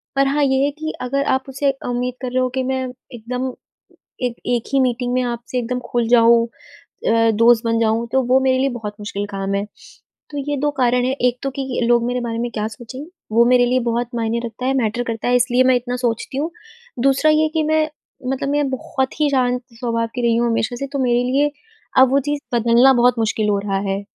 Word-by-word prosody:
पर 275 0 +3
हाँ 285 +1 +1
ये 265 0 +2
है 290 - 0
कि 315 0 -3
अगर 275 +3 -1
आप 265 0 0
उसे 275 +1 +1 0.2
उम्मीद 245 +1 -1
कर 255 -2 -4
रहे 255 - +1
हो 255 - +1
कि 260 - +1
मैं 260 0 -1 0.3
एकदम 250 +3 -4 0.7
एक 245 -1 0
एक 240 -2 +1
ही 275 - +3
मीटिंग 245 -1 0
में 255 - +2
आपसे 240 +1 -3
एकदम 250 +1 -2
खुल 240 -2 -1
जाऊँ 235 -1 +5 0.4
अ, 230 0 +1
दोस्त 230 +2 +4
बन 230 0 +1
जाऊँ, 225 +1 +1
तो 265 - +4
वो 260 +1 +5
मेरे 260 -1 +2
लिए 270 +1 +2
बहुत 220 -5 -6
मुश्किल 205 -1 -4
काम 195 0 -3
है। 200 - 0 0.7
तो 290 - -6
ये 290 - 0
2 295 +2 0
कारण 250 0 +2
हैं, 265 +1 0
एक 250 0 +2
तो 275 - 0
कि 265 -2 -3
लोग 235 -1 +4
मेरे 250 0 -1
बारे 230 -1 -3
में 240 - -1
क्या 215 0 -2
सोचेंगे, 240 +6 -9 0.2
वो 235 +2 +5
मेरे 245 0 +5
लिए 255 +1 +2
बहुत 235 +1 -1
मायने 230 0 -1
रखता 235 +2 -6
है, 265 - +2
मैटर 235 0 0
करता 225 0 -3
है 250 - +3
इसलिए 245 +1 +3
मैं 260 0 +4
इतना 245 0 -2
सोचती 235 +3 -2
हूँ। 315 +4 -1 0.5
दूसरा 275 +3 +4
ये 310 +1 +3
कि 315 - +2
मैं 310 0 +2 0.4
मतलब 270 +1 -2
मैं 290 -1 +1
बहुत 265 +1 -3
ही 295 - +3
शांत 250 -2 +1
स्वभाव 230 -1 -2
की 245 - -2
रही 235 -1 +3
हूँ 235 0 +1
हमेशा 230 +1 -1
से 275 - -3
तो 280 - -1
मेरे 245 -1 +2
लिए 290 +2 +2 0.5
अब 260 -1 +6
वो 275 - +4
चीज़ 290 -1 -1
बदलना 235 +3 +5
बहुत 245 0 +3
मुश्किल 220 -1 0
हो 200 -1 +2
रहा 200 -1 -2
है। 200 +1 -3
245 Hz, 230 wpm, -20 LUFS, 230-265 Hz, 0.7 s, अब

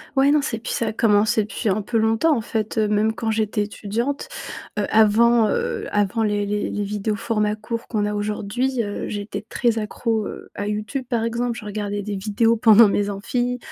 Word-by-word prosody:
Ouais, 270 +1 +4
non, 300 - +4
c'est 230 - -2
et - - -9
puis, 225 - -4
ça 230 - -1
a 215 - -2
commencé 215 0 +3
depuis 215 +1 -3
un 200 +2 +1
peu 230 +3 -1
longtemps 225 +7 +3
en - - -1
fait, 220 0 -3
heu, 215 -1 +3
même 215 +1 +2
quand 225 -1 -1
j'étais 215 -1 0
étudiante, 230 - -3 0.5
heu, 205 - +1
avant, 220 +1 +5
heu, - - -2
avant 205 +2 +1
les 205 -1 +1
les 205 0 -1
les 205 - -2
vidéos 210 +1 -2
format 210 -2 0
court 225 +2 -5
qu'on 210 -3 0
a 210 - -1
aujourd'hui, 215 +5 -1
heu, 205 -1 -4
j'étais 205 0 -5
très 235 -3 +1
accro, 220 0 -2
heu, - - -9
à 205 - -4
YouTube 215 +6 -3
par 230 -2 0
exemple, 235 +1 -1
je 215 - -9
regardais 205 0 -3
des 205 0 -4
vidéos 215 +3 +2
pendant 220 -1 +7
mes 205 0 0
amphis. 245 +5 -2
215 Hz, 210 wpm, -22 LUFS, 205-230 Hz, 0.5 s, pendant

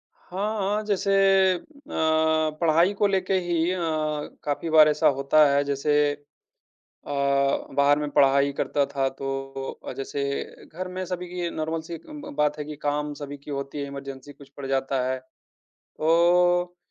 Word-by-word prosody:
हाँ, 205 +4 -4
हाँ, 205 +2 0
जैसे 200 -1 0 0.4
अ, 175 - -5 0.3
पढ़ाई 160 +2 +2
को 205 +1 +2
लेके 190 -1 0
ही 170 0 +1
अ, 185 - -3 0.7
काफ़ी 150 +3 -2
बार 155 -1 +7
ऐसा 150 0 +3
होता 140 +3 +5
है 140 0 +3
जैसे 140 +1 -1 0.2
अ, 145 0 -16 1.3
बाहर 140 +1 +4
में 150 - -2
पढ़ाई 140 0 +4
करता 140 +1 0
था, 135 -1 -1
तो 135 0 -5 0.2
अ, - - -4
जैसे 140 +1 -4 0.4
घर 185 +3 -6
में 185 0 -4
सभी 180 0 -5
की 175 -1 -3
नॉर्मल 160 0 -3
सी 170 +1 -7
एक 165 - -11
ब 295 - -8
बात 150 0 +1
है 150 - -3
कि 150 0 -7
काम 150 0 -1
सभी 145 0 -7
की 140 - -11
होती 140 +1 -4
है, 140 - -3
इमरजेंसी 140 0 -8
कुछ 140 -1 -16
पड़ 140 - -6
जाता 135 0 0
है। 130 0 -1 0.6
तो, 175 +2 +2
150 Hz, 165 wpm, -25 LUFS, 140-175 Hz, 1.3 s, बार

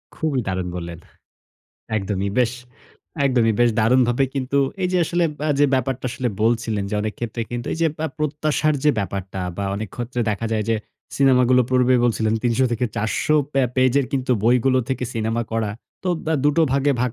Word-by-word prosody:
খুবই 150 -5 -1
দারুণ 95 -1 -2
বললেন, 85 -1 -6 1.0
একদমই 100 0 -2
বেশ, 120 -1 +3 0.7
একদমই 120 -5 +3
বেশ 120 -1 +5
দারুণভাবে 125 +3 +3
কিন্তু 135 +1 0 0.2
এই 180 - +1
যে, - - +2
আসলে 175 +1 0 0.2
আ - - +2 0.2
ব্যাপারটা 130 0 -1
আসলে 125 +1 -2
বলছিলেন, 110 -3 +1
যে, - - -2
অনেক 110 -1 -3
ক্ষেত্রে 115 0 -3
কিন্তু 120 0 -4
এই - - -7
যে, - - +5
পা 160 - -1
প্রত্যাশার 150 0 0
যে, 150 - +6
ব্যাপারটা 95 -1 -4 0.2
বা 100 - -2
অনেক 105 -1 -4
ক্ষেত্রে 120 0 -3
দেখা 110 +2 -2
যায় 105 -1 0
যে, 110 - +2 0.4
সিনেমাগুলো 125 -2 +4
পূর্বে 125 0 +4
বলছিলেন 110 -2 +1
৩০০ 120 +2 +2
থেকে 120 +2 0
৪০০ 115 +8 0 0.2
প্যা 135 -1 +3
পেজের 130 +1 +3 0.4
বইগুলো 125 +2 +3
থেকে 130 -1 -1
সিনেমা 115 +1 -1
করা 110 -2 0 0.3
তো - - 0 0.2
দা 160 - +1
২ 145 - +5
টো 165 - +5
ভাগে 140 +1 +2
ভাগ 125 -2 0
120 Hz, 175 wpm, -22 LUFS, 110-135 Hz, 1.0 s, যে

